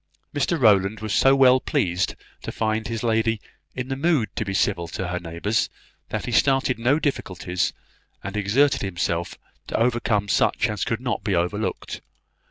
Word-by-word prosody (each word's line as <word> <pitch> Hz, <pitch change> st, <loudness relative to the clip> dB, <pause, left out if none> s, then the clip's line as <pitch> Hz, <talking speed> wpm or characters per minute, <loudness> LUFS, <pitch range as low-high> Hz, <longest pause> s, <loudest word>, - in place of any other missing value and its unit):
Mr 145 Hz, +4 st, 0 dB
Rowland 105 Hz, -2 st, +4 dB
was 110 Hz, -1 st, -3 dB
so 135 Hz, 0 st, +5 dB
well 130 Hz, -1 st, +6 dB
pleased 90 Hz, -5 st, 0 dB, 0.3 s
to -, -, -5 dB
find 110 Hz, 0 st, -1 dB
his 115 Hz, -1 st, -4 dB
lady 115 Hz, -1 st, +1 dB, 0.4 s
in 125 Hz, 0 st, -4 dB
the 135 Hz, -, -1 dB
mood 145 Hz, -5 st, +1 dB
to -, -, -1 dB
be 100 Hz, -, -4 dB
civil 95 Hz, -3 st, 0 dB
to 90 Hz, +1 st, -4 dB
her 90 Hz, 0 st, -2 dB
neighbours, 85 Hz, +6 st, -1 dB, 0.4 s
that -, -, -3 dB
he -, -, -4 dB
started 135 Hz, 0 st, +2 dB
no 125 Hz, +5 st, +3 dB
difficulties, 95 Hz, -, -2 dB, 0.5 s
and 100 Hz, +1 st, -5 dB
exerted 115 Hz, +8 st, +2 dB
himself 85 Hz, -3 st, -2 dB, 0.3 s
to -, -, -2 dB
overcome 115 Hz, -3 st, +1 dB
such -, -, +2 dB
as 105 Hz, -, -2 dB
could 115 Hz, 0 st, -2 dB
not 125 Hz, -2 st, -2 dB
be 100 Hz, -4 st, 0 dB
overlooked. 90 Hz, +5 st, -2 dB
110 Hz, 170 wpm, -24 LUFS, 95-125 Hz, 0.5 s, well